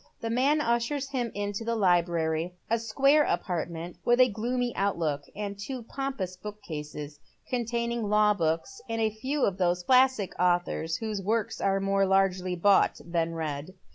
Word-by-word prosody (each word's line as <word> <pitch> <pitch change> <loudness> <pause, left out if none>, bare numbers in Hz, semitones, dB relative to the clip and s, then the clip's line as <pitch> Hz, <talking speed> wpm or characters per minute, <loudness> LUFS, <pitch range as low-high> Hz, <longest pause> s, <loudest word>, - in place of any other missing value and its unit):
The 225 - -2
man 275 +6 +3
ushers 240 +4 0
him 250 -4 -1
into 205 +1 -3
the 230 +1 -1
library 175 -3 +1
— - - -39
a 230 - +3
square 275 +7 +3
apartment 170 - -3
with 240 +1 +3
a 255 0 +7
gloomy 240 +3 -2
outlook, 170 -7 0
and 200 -1 -5
two 250 +4 -5
pompous 230 -8 -4
bookcases, 150 -7 -7 0.3
containing 235 -2 -1
law 210 0 +4
books, 165 - -2
and 225 0 -2
a 220 -1 +2
few 265 +6 -1
of 195 -1 -2
those 180 0 +1
classic 255 -4 +3
authors 175 -2 +1
whose 215 -3 -3
works 215 +2 -1
are 195 0 +2
more 195 0 +2
largely 190 -1 +2
bought 200 +3 +3
than 170 -1 -1
read. 155 +2 -4
200 Hz, 160 wpm, -28 LUFS, 175-235 Hz, 0.3 s, a